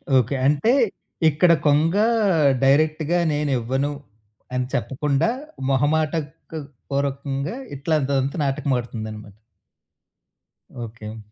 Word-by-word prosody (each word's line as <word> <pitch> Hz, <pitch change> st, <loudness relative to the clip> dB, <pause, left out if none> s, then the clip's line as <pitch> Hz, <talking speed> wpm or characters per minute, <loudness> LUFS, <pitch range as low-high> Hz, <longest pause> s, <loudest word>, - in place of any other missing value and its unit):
Okay. 130 Hz, +2 st, +3 dB
అంటే, 150 Hz, -, +3 dB, 0.6 s
ఇక్కడ 165 Hz, +4 st, +4 dB, 0.2 s
కొంగా 165 Hz, +8 st, +3 dB, 0.6 s
డైరెక్ట్‌గా 155 Hz, +4 st, +3 dB
నేనివ్వను 135 Hz, -1 st, 0 dB, 0.6 s
అని 125 Hz, 0 st, 0 dB
చెప్పకుండా, 140 Hz, -, 0 dB, 0.4 s
మొహమాటక్ 150 Hz, +2 st, +1 dB, 0.6 s
పూర్వకంగా 140 Hz, -, -2 dB, 0.2 s
ఇట్లాంటిదంతా 140 Hz, -1 st, 0 dB
నాటకమాడుతుందనమాట. 115 Hz, -7 st, -3 dB, 1.5 s
ఓకే. 110 Hz, 0 st, -9 dB
140 Hz, 70 wpm, -23 LUFS, 130-150 Hz, 1.5 s, ఇక్కడ